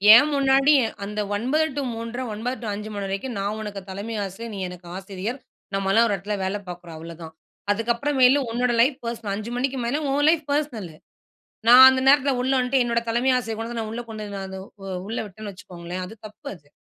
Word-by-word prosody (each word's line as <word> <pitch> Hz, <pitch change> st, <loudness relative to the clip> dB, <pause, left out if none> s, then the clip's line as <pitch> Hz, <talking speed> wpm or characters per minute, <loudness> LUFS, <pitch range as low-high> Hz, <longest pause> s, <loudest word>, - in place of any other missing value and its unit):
என் 290 Hz, +5 st, +6 dB
முன்னாடி 275 Hz, +1 st, +4 dB, 0.3 s
அந்த 210 Hz, +1 st, -5 dB, 0.2 s
9:00 290 Hz, +8 st, +1 dB
two -, -, +1 dB
3:30, 230 Hz, +3 st, -4 dB
9:00 245 Hz, +5 st, -3 dB
two 225 Hz, -, -5 dB
5 210 Hz, +1 st, -5 dB
மணி 200 Hz, -1 st, -3 dB
வரைக்கும் 200 Hz, +5 st, -4 dB
நான் 205 Hz, +2 st, -2 dB
உனக்கு 205 Hz, -2 st, -5 dB
தலைமை 210 Hz, +4 st, -5 dB
ஆசிரியர். 220 Hz, +4 st, -7 dB
நீ -, -, -5 dB
எனக்கு 180 Hz, -1 st, -11 dB
ஆசிரியர். 195 Hz, +6 st, -5 dB, 0.4 s
நம்மலாம் 195 Hz, +4 st, +3 dB
ஒரு 205 Hz, -, +1 dB
இடத்துல 205 Hz, +2 st, -3 dB
வேலை 200 Hz, +2 st, -1 dB
பார்க்குறோம் 175 Hz, -2 st, -8 dB
அவ்வளோதான். 165 Hz, 0 st, -9 dB, 0.4 s
அதுக்கப்புறம் 235 Hz, +6 st, -1 dB
மேல 265 Hz, +3 st, +6 dB
உன்னோட 245 Hz, +1 st, +1 dB
லைஃப் 260 Hz, +2 st, +3 dB
பர்ஸ்னல் 230 Hz, -4 st, -3 dB
5 215 Hz, +3 st, -5 dB
மணிக்கு 265 Hz, +1 st, -1 dB
மேல 285 Hz, +6 st, 0 dB
உன் 290 Hz, +2 st, +2 dB
லைஃப் 315 Hz, -3 st, +2 dB
பெர்சனல். 255 Hz, -, -1 dB, 0.8 s
நான் 255 Hz, +2 st, +11 dB
அந்த 260 Hz, 0 st, 0 dB
நேரத்துல 280 Hz, -1 st, +5 dB
உள்ள 260 Hz, +1 st, +1 dB
வந்துட்டு 255 Hz, +1 st, +2 dB
என்னோட 235 Hz, 0 st, +1 dB
தலைமை 250 Hz, +3 st, +2 dB
ஆசிரியர் 225 Hz, -2 st, -4 dB
கொண்டு 225 Hz, +1 st, -4 dB
வந்து 230 Hz, -, -3 dB
நான் 215 Hz, -, -5 dB
உள்ள 240 Hz, -, -4 dB
கொண்டு 200 Hz, -3 st, -6 dB, 0.5 s
உள்ள 225 Hz, -, -3 dB
விட்டேன்னு 205 Hz, +1 st, -8 dB
வச்சுக்கோங்களேன் 180 Hz, 0 st, -7 dB
அது 220 Hz, -, -10 dB
தப்பு 210 Hz, -, -10 dB
அது. 145 Hz, -5 st, -20 dB
225 Hz, 195 wpm, -24 LUFS, 195-255 Hz, 0.8 s, நான்